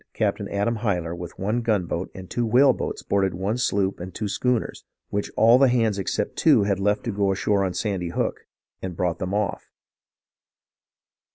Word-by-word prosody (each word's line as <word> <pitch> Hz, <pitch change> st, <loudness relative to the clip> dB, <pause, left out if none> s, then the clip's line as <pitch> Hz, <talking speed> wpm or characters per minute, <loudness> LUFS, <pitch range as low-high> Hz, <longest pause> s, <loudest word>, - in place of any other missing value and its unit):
Capt. -, -, 0 dB
Adam 105 Hz, +3 st, 0 dB
Hyler 90 Hz, -7 st, -1 dB
with 85 Hz, -1 st, -8 dB
one 105 Hz, +5 st, -1 dB
gunboat 95 Hz, -6 st, -1 dB
and 95 Hz, -1 st, -8 dB
two 120 Hz, +4 st, -1 dB
whale 130 Hz, +4 st, +5 dB
boats -, -, -4 dB
boarded 95 Hz, -2 st, +1 dB
one 100 Hz, +7 st, -2 dB
sloop 100 Hz, -4 st, 0 dB
and 90 Hz, +2 st, -6 dB
two 105 Hz, -, -2 dB
schooners, 120 Hz, +3 st, -1 dB, 0.3 s
which 100 Hz, 0 st, -2 dB
all 115 Hz, +3 st, +6 dB
the 135 Hz, -, +6 dB
hands 115 Hz, -5 st, +1 dB
except 95 Hz, -, -2 dB
two -, -, +5 dB
had 100 Hz, -1 st, 0 dB
left 105 Hz, +1 st, +1 dB
to 120 Hz, -, -2 dB
go 100 Hz, -1 st, +1 dB
ashore 100 Hz, +1 st, +1 dB
on 95 Hz, -2 st, -2 dB
Sandy 95 Hz, -5 st, -2 dB
Hook, -, -, -3 dB, 0.3 s
and 90 Hz, -2 st, -5 dB
brought 85 Hz, -2 st, -1 dB
them 95 Hz, 0 st, -3 dB
off. 105 Hz, -2 st, -2 dB
100 Hz, 180 wpm, -24 LUFS, 95-110 Hz, 0.3 s, all